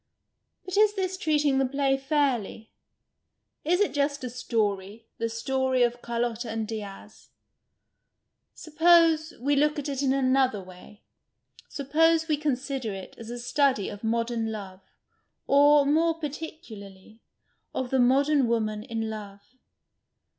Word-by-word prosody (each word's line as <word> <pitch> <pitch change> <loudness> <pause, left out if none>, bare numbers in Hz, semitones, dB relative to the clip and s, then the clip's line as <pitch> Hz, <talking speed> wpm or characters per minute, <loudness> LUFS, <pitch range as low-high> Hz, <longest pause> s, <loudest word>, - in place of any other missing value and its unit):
But 370 +1 -4
is 420 0 +4
this 380 -1 -2
treating 295 -5 +1
the 270 - +2
play 275 0 +1
fairly? 270 -6 -1 0.9
Is 355 +4 +1
it 415 - +1
just 285 -1 -1
a 250 - -4
story, 215 -3 -2
the 230 0 -1
story 260 +2 0
of 240 0 -1
Carlotta 235 0 -3
and 220 -1 -3
Diaz? 210 -3 -9 1.3
Suppose 325 0 +3
we 285 +4 +1
look 300 +2 +2
at 290 - -4
it 275 -2 -3
in 270 -2 +2
another 260 -4 +2
way, 185 +2 -14 0.7
suppose 320 +3 +2
we 310 - +2
consider 270 -4 -2
it 190 - -9
as 230 -1 -9
a 240 - -5
study 250 -2 +1
of 205 - -10
modern 230 0 -1
love, 195 -3 -8 0.6
or, 290 +1 +5
more 325 +3 +2
particularly, 225 -10 -9 0.5
of 255 -1 -4
the 265 - +2
modern 275 +2 +3
woman 215 -2 -1
in 225 -1 -4
love. 205 -2 -8
260 Hz, 130 wpm, -26 LUFS, 225-295 Hz, 1.3 s, or